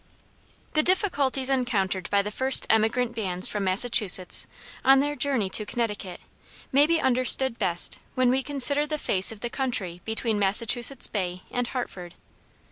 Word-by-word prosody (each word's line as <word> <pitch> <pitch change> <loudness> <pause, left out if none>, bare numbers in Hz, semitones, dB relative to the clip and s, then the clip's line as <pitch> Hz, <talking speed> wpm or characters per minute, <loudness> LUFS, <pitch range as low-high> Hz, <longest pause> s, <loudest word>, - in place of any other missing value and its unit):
The 310 - +3
difficulties 290 -8 +1
encountered 205 -9 -2
by 200 0 +1
the 210 - -6
first 260 +4 -1
emigrant 225 +2 0
bands 185 -5 -1
from 205 -1 -4
Massachusetts, 190 -2 +3 0.4
on 270 0 +5
their 290 +1 -2
journey 270 -9 -1
to 215 - +2
Connecticut, 210 -5 -5 0.5
may 285 +3 +4
be 335 0 +1
understood 255 -1 +2
best 175 -4 +2 0.2
when 255 -1 +2
we 265 +1 0
consider 285 +1 0
the 305 0 -3
face 190 -9 +1
of 220 - -12
the 240 - -4
country 195 -10 -2
between 220 -1 -2
Massachusetts 230 +6 +2
Bay 185 -3 -5
and 245 -1 -3
Hartford. 180 -9 -7
235 Hz, 150 wpm, -24 LUFS, 200-265 Hz, 0.5 s, on